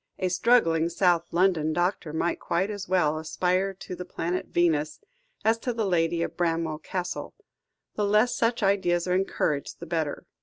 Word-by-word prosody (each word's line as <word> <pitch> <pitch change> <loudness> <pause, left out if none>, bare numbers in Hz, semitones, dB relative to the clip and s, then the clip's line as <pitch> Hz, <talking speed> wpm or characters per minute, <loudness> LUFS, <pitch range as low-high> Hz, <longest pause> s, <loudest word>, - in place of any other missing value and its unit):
A 185 - 0
struggling 175 -5 +3
South 170 -1 +2
London 170 -3 +2
doctor 175 -1 -1
might 165 +2 -1
quite 185 +5 -1
as 205 -1 -6
well 155 -4 +2
aspire 180 +4 0
to 185 - -8
the 180 - -6
planet 180 0 -3
Venus, 155 -3 +1 0.5
as 225 +1 +3
to 245 +1 -2
the 225 -2 -1
lady 170 -2 +1
of - - -5
Bramwell 165 -3 -1
Castle. 180 +2 -5 0.6
The 210 - -1
less 210 +4 +3
such 230 -1 0
ideas 185 -3 +2
are 180 - +1
encouraged, 180 -6 -1
the - - -7
better." 160 -4 -2
175 Hz, 165 wpm, -26 LUFS, 165-195 Hz, 0.6 s, struggling